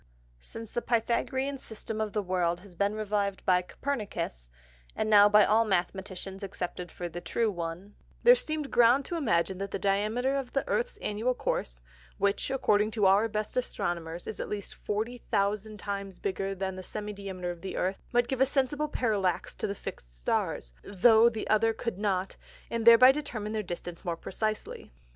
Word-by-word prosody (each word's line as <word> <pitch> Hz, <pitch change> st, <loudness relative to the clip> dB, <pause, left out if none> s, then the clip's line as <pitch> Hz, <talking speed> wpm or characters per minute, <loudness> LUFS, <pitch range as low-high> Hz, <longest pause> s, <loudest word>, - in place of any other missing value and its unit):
Since 225 Hz, -, -8 dB
the 240 Hz, -, -1 dB
Pythagorean 260 Hz, +4 st, 0 dB
System 220 Hz, -1 st, -5 dB
of 215 Hz, -1 st, -1 dB
the 210 Hz, 0 st, -1 dB
World 180 Hz, -2 st, 0 dB
has 195 Hz, -1 st, -13 dB
been 200 Hz, +4 st, 0 dB
reviv'd 205 Hz, -2 st, -1 dB
by 180 Hz, -1 st, +4 dB
Copernicus, 200 Hz, -, -4 dB, 0.5 s
(and 215 Hz, -, -1 dB
now 205 Hz, 0 st, +8 dB
by 210 Hz, -1 st, +7 dB
all 220 Hz, +2 st, +4 dB
Mathematicians 190 Hz, 0 st, -2 dB
accepted 180 Hz, -2 st, -5 dB
for 175 Hz, -, -5 dB
the 175 Hz, +1 st, -7 dB
true 225 Hz, +3 st, 0 dB
one) 175 Hz, +3 st, -5 dB, 0.3 s
there 485 Hz, -, +9 dB
seem'd 310 Hz, -, -2 dB
Ground 245 Hz, +3 st, +5 dB
to 345 Hz, -, -4 dB
imagine 190 Hz, -, +1 dB
that 195 Hz, 0 st, -3 dB
the -, -, -3 dB
Diameter 215 Hz, +7 st, +1 dB
of 265 Hz, -3 st, -5 dB
the 275 Hz, -, 0 dB
Earth's 485 Hz, +1 st, -1 dB
Annual 225 Hz, +5 st, 0 dB
Course -, -, -2 dB, 0.4 s
(which, 200 Hz, +5 st, +1 dB
according 215 Hz, -5 st, +2 dB
to 215 Hz, -2 st, +1 dB
our 200 Hz, +4 st, +5 dB
best 215 Hz, -1 st, -3 dB
Astronomers, 175 Hz, -8 st, -3 dB
is 220 Hz, -, -6 dB
at -, -, -4 dB
least 205 Hz, -2 st, -5 dB
40000 210 Hz, -1 st, -2 dB
times 200 Hz, -1 st, -5 dB
bigger 195 Hz, 0 st, -2 dB
than 190 Hz, 0 st, -3 dB
the 185 Hz, -, -6 dB
Semi 210 Hz, +2 st, -5 dB
diameter 190 Hz, -3 st, -5 dB
of 175 Hz, -1 st, -10 dB
the 190 Hz, -, -5 dB
Earth) 190 Hz, +2 st, -1 dB
might 240 Hz, -1 st, +3 dB
give 265 Hz, 0 st, -2 dB
a -, -, +7 dB
sensible 280 Hz, +2 st, +1 dB
Parallax 205 Hz, -9 st, 0 dB
to -, -, -3 dB
the 200 Hz, -, -3 dB
fix'd -, -, -8 dB
Stars, -, -, -2 dB
though 220 Hz, +4 st, +5 dB
the 225 Hz, -2 st, -5 dB
other 225 Hz, +1 st, +3 dB
could 225 Hz, -3 st, -4 dB
not, 195 Hz, -2 st, -1 dB, 0.3 s
and 230 Hz, 0 st, -1 dB
thereby 235 Hz, +3 st, +10 dB
determine 240 Hz, -7 st, -4 dB
their 215 Hz, -1 st, -1 dB
Distance 175 Hz, -2 st, -7 dB
more 170 Hz, -1 st, -2 dB
precisely. 215 Hz, +5 st, -4 dB
210 Hz, 180 wpm, -29 LUFS, 190-230 Hz, 0.5 s, thereby